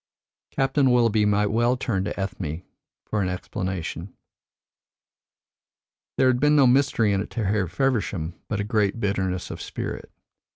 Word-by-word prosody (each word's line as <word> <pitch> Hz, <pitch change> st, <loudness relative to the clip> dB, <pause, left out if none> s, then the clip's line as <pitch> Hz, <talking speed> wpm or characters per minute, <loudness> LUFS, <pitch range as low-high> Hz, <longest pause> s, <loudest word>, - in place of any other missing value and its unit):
Captain 135 Hz, 0 st, +2 dB
Willoughby 115 Hz, -4 st, +3 dB
might 105 Hz, 0 st, +2 dB
well 120 Hz, +3 st, +2 dB
turn 100 Hz, -7 st, -1 dB
to 105 Hz, -, -4 dB
Ethne 90 Hz, -4 st, -4 dB, 0.4 s
for 105 Hz, -, -1 dB
an 90 Hz, -, 0 dB
explanation. 90 Hz, -1 st, -4 dB, 2.1 s
There -, -, +4 dB
had 130 Hz, -1 st, +3 dB
been 150 Hz, +2 st, +4 dB
no 140 Hz, -2 st, +6 dB
mystery 125 Hz, -5 st, +3 dB
in 95 Hz, -, +1 dB
it -, -, -6 dB
to 115 Hz, -4 st, -3 dB
Harry 100 Hz, -1 st, +1 dB
Feversham, 100 Hz, -, -1 dB
but 105 Hz, -, -2 dB
a -, -, 0 dB
great 105 Hz, 0 st, 0 dB
bitterness 95 Hz, -3 st, -1 dB
of -, -, -7 dB
spirit. -, -, -6 dB
105 Hz, 150 wpm, -24 LUFS, 95-125 Hz, 2.1 s, no